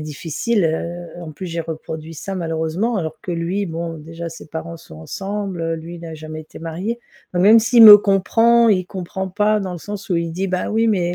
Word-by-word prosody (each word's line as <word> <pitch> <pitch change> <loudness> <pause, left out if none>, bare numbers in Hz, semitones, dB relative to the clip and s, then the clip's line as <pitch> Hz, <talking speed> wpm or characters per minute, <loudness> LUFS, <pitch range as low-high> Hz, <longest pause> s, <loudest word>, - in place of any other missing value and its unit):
difficile. 165 +8 -2
Heu, 170 +2 -3
en 160 -2 -8
plus 185 +5 -7
j'ai 170 0 -3
reproduit 160 0 -7
ça 195 +5 -5
malheureusement 165 +6 -1
alors 160 -3 -4
que 180 - -5
lui, 175 +4 -2
bon, 165 0 -4
déjà 165 +2 -7
ses 165 - -11
parents 165 +1 -6
sont 120 - -14
ensemble, 190 - -4
lui 170 +2 -8
n'a 165 -1 -8
jamais 155 0 -8
été 155 - -13
marié. 180 +9 -4 0.3
Même 205 +6 +6
s'il 230 +1 +5
me 210 -2 +12
comprend 225 +4 +3
il 185 -4 +2
comprend 190 +1 -5
pas 210 +2 +2
dans 190 -2 -4
le 175 - -6
sens 205 +3 -7
où 180 - +1
il 170 0 -1
dit: 190 +4 -2
«Bah, 185 -1 -2
oui, 225 +1 +2
mais 180 -5 +1
175 Hz, 205 wpm, -20 LUFS, 165-200 Hz, 0.3 s, me